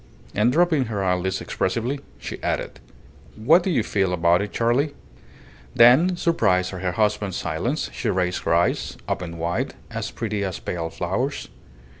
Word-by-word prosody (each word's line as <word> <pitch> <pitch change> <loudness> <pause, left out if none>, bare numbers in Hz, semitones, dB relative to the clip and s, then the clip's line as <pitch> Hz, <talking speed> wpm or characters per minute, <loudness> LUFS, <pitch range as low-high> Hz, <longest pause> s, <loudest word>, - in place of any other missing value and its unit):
And 105 +4 +3
dropping 160 -2 +3
her 105 -4 -3
eyelids 95 0 0
expressively, 120 +8 -2 0.2
she - - -7
added - - -2 0.6
"What 155 +12 +5
do 190 - -2
you 135 -11 +2
feel 95 -3 0
about 85 +1 +3
it, 100 - -4
Charley?" 125 +6 +1 0.8
Then, 155 +10 +6
surprised 95 - +1
at 90 - -6
her 90 -1 -1
husband's 105 -2 0
silence, - - -2
she - - -2
raised 90 -1 0
her - - 0
eyes, 85 - 0
opened 85 -2 -3
wide, 85 +2 -2 0.2
as - - -3
pretty 105 -3 -3
as 95 -2 -3
pale 85 -2 -4
flowers. - - -3
100 Hz, 155 wpm, -23 LUFS, 90-125 Hz, 0.8 s, Then